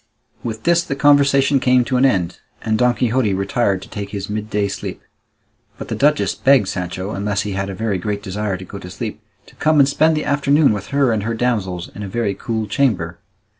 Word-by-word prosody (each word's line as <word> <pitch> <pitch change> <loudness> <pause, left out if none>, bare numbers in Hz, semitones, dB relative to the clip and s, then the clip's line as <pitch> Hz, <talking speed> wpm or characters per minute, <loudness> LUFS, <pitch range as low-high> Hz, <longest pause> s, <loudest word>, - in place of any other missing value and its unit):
With 110 -2 -5
this, 170 0 +3
the 140 - -3
conversation 140 -1 +4
came 125 -1 +3
to 130 - -1
an 125 +2 +4
end, 90 -9 -1 0.2
and 110 - 0
Don 125 +1 +3
Quixote 115 -3 +1
retired 100 -1 0
to - - -12
take 100 -1 -6
his 100 0 -5
midday 105 -1 -1
sleep; 100 - -6 0.8
but - - -8
the - - -2
duchess 150 +1 +2
begged 135 -7 +3
Sancho, 95 +1 -4
unless 100 +1 -1
he 105 - -4
had 95 0 -3
a 95 - -5
very 105 -2 -1
great 100 +2 -3
desire 100 0 -3
to 95 - -9
go 100 - -9
to 90 - -9
sleep, - - -6 0.2
to - - -18
come 155 0 +2
and 140 - +6
spend 155 +2 +2
the 150 - -2
afternoon 140 -1 +3
with 105 0 -5
her 140 -3 +2
and 110 -2 0
her 115 +3 -2
damsels 100 -7 -1
in 105 - -7
a 100 - -4
very 105 0 -1
cool 110 +1 -3
chamber. 95 -7 0
110 Hz, 215 wpm, -19 LUFS, 100-135 Hz, 0.8 s, and